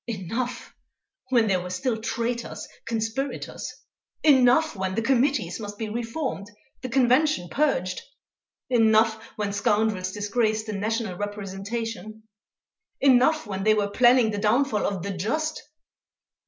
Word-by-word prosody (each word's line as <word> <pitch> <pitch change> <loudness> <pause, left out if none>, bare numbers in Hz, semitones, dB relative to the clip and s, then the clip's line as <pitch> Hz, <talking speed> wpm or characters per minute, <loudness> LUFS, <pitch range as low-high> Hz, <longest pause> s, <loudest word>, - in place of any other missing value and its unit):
Enough, 230 +4 -4 0.6
when 240 -3 +4
there 190 -4 +1
were 180 - -6
still 220 +5 -2
traitors, 235 +1 -3 0.2
conspirators! 230 +4 -3 0.5
Enough, 275 +1 +5
when 190 -1 -2
the 225 - 0
Committees 265 0 +1
must 205 -1 -7
be 220 -1 -4
reformed, 230 -1 -4 0.3
the 255 - -5
Convention 260 - +2
purged! 185 - 0 0.7
Enough, 225 -2 +4 0.2
when 205 -1 -2
scoundrels 205 -2 +1
disgraced 215 +2 0
the 215 - -4
National 215 -1 -2
representation. 205 +2 -5 0.8
Enough, 275 +3 +4
when 195 -2 -4
they 215 +1 +4
were 205 -1 0
planning 245 -1 +5
the 205 - -3
downfall 220 +2 +2
of 190 -4 -3
_The 195 -2 -4
Just! 310 - -1
220 Hz, 125 wpm, -25 LUFS, 205-250 Hz, 0.8 s, Enough